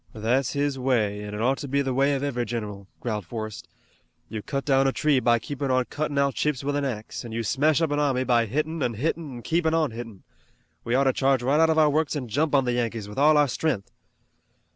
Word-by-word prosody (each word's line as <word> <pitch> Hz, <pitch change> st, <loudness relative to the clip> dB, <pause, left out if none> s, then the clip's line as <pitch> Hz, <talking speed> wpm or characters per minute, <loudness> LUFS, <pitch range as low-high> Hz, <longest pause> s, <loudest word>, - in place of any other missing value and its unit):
"That's 120 Hz, +4 st, 0 dB
his 140 Hz, -1 st, -1 dB
way, 110 Hz, -6 st, 0 dB
an' 105 Hz, 0 st, -6 dB
it 105 Hz, -, -4 dB
ought 130 Hz, +4 st, +1 dB
to 145 Hz, -, -5 dB
be 140 Hz, +1 st, +1 dB
the 135 Hz, -1 st, -1 dB
way 140 Hz, +2 st, +2 dB
of 135 Hz, -, -3 dB
every 125 Hz, -4 st, -1 dB
general," 105 Hz, -4 st, -5 dB
growled 110 Hz, -4 st, -2 dB
Forrest. 110 Hz, +2 st, -6 dB, 0.6 s
"You 110 Hz, -, -5 dB
cut 140 Hz, +5 st, -4 dB
down 135 Hz, -1 st, +3 dB
a -, -, +3 dB
tree 145 Hz, -1 st, +2 dB
by 120 Hz, -2 st, +3 dB
keepin' 140 Hz, +4 st, -4 dB
on 130 Hz, -1 st, +2 dB
cuttin' 145 Hz, -1 st, -2 dB
out 140 Hz, -1 st, +2 dB
chips 150 Hz, -4 st, -1 dB
with 145 Hz, +1 st, -1 dB
an 145 Hz, -, 0 dB
axe, 115 Hz, -4 st, -4 dB
an' 115 Hz, -2 st, -8 dB
you 115 Hz, 0 st, -2 dB
smash 150 Hz, +8 st, +2 dB
up 160 Hz, -, 0 dB
an 145 Hz, -, +1 dB
army 135 Hz, -3 st, +1 dB
by 120 Hz, -3 st, +2 dB
hittin' 155 Hz, +7 st, -2 dB
an' 120 Hz, -3 st, 0 dB
hittin' 155 Hz, +5 st, -2 dB
an' 120 Hz, -, -8 dB
keepin' 165 Hz, -1 st, +1 dB
on 155 Hz, -5 st, +1 dB
hittin'. 115 Hz, -4 st, -9 dB, 0.6 s
We 115 Hz, -, 0 dB
ought 135 Hz, -, +4 dB
to 135 Hz, -1 st, +2 dB
charge 135 Hz, -2 st, +2 dB
right 140 Hz, +5 st, +2 dB
out 160 Hz, 0 st, +5 dB
of 160 Hz, -, +2 dB
our 155 Hz, -2 st, +5 dB
works 155 Hz, +1 st, 0 dB
an' 130 Hz, -5 st, -4 dB
jump 145 Hz, +6 st, +1 dB
on 135 Hz, -2 st, +3 dB
the 125 Hz, -, 0 dB
Yankees 115 Hz, -3 st, -2 dB
with 105 Hz, +5 st, -6 dB
all 150 Hz, +1 st, +5 dB
our 145 Hz, -, +5 dB
stren'th." 125 Hz, -4 st, -2 dB
135 Hz, 250 wpm, -25 LUFS, 115-145 Hz, 0.6 s, out